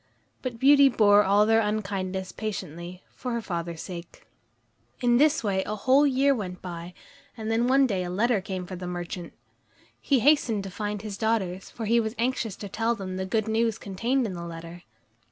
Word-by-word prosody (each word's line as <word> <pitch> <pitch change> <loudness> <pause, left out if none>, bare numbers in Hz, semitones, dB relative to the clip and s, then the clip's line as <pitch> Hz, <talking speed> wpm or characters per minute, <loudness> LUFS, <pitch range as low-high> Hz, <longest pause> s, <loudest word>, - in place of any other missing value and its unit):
But 250 -3 -4
Beauty 280 +2 +6
bore 210 -4 +5
all 205 +2 +4
their 225 +1 +4
unkindness 195 -3 -2
patiently, 180 -4 -6
for 250 -2 -5
her 235 - 0
father's 170 -4 -4
sake. 175 -2 -9 0.7
In 240 -1 +3
this 300 -1 +3
way 195 -3 +1
a 215 - -4
whole 265 +7 +4
year 275 +1 +3
went 185 -7 -5
by, 175 0 -8 0.4
and 220 0 -3
then 230 +2 +2
one 270 +1 +5
day 195 -7 -1
a 175 - -4
letter 210 +3 +1
came 185 -1 -5
for 185 - -7
the 180 0 -6
merchant. 175 0 -5 0.7
He 270 -4 +2
hastened 245 -7 +3
to 195 - -7
find 210 +1 -4
his 205 -2 -6
daughters, 195 -5 -1
for 225 - -6
he 230 +2 +3
was 220 0 -2
anxious 235 -4 -1
to 205 - -7
tell 225 +4 0
them 185 -3 -5
the 190 0 -3
good 220 +2 0
news 225 0 +1
contained 235 +7 -1
in 200 - -3
the 175 - -6
letter. 170 +1 -8
210 Hz, 190 wpm, -26 LUFS, 185-235 Hz, 0.7 s, Beauty